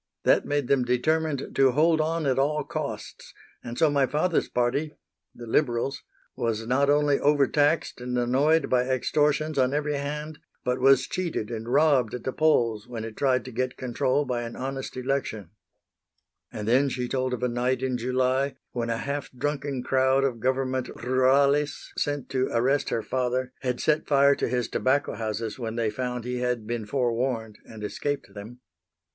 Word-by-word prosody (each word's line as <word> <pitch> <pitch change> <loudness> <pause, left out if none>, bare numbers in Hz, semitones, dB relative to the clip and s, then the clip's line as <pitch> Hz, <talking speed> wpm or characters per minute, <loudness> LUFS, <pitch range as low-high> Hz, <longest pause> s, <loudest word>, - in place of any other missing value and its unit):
That - - +3
made 145 -3 0
them 135 -1 +3
determined 145 +4 0
to 135 -2 +4
hold 160 +3 +3
on 160 0 -1
at 135 -1 +1
all 150 +2 +1
costs, - - -6 0.3
and 120 0 -7
so 160 - +4
my 140 -2 +2
father's 160 +5 0
party 140 +6 0 0.4
the 120 - -9
Liberals 120 +2 0 0.3
was 115 -1 -2
not 135 +4 +2
only 145 -1 +3
over 145 -1 +4
taxed 150 -2 +1
and 125 0 -3
annoyed 135 +6 +2
by 125 0 +1
extortions 150 +3 +1
on 130 +2 +2
every 150 0 0
hand, 150 +2 -4 0.2
but 125 0 -1
was 135 0 +5
cheated 170 -12 -3
and 115 +1 -5
robbed 140 -5 +3
at 125 - -7
the 130 - -3
polls 120 -9 +2
when 115 -3 -6
it 110 -1 -8
tried 130 -3 +1
to 130 - -7
get 130 +2 -2
control 130 +3 0
by 125 -2 -2
an 115 0 -6
honest 135 0 -5
election." 125 -8 -2 1.0
And 105 0 -6
then 130 +4 +4
she 125 -1 -3
told 130 0 -1
of 125 0 -3
a - - +3
night 125 +1 -1
in 130 -1 0
July 130 +3 0 0.2
when 120 -1 -3
a 115 - 0
half 140 +4 -4
drunken 140 0 -3
crowd 130 +1 +2
of 125 -4 -1
Government 130 +1 0
rurales, 135 +3 +2
sent 145 -2 -2
to 130 -1 0
arrest 130 +5 +1
her 115 - -1
father, 130 0 -1
had 125 -2 -2
set 155 0 +1
fire 140 -1 +5
to - - -1
his 125 -1 -1
tobacco 140 +2 0
houses 110 +1 -4
when 115 -2 -4
they 115 -2 0
found 125 -1 -3
he 125 0 -3
had 125 -3 -1
been 115 -1 -4
forewarned 120 -3 -1
and 110 -1 -10
escaped 140 0 -3
them. 110 +5 -10
130 Hz, 175 wpm, -26 LUFS, 120-140 Hz, 1.0 s, was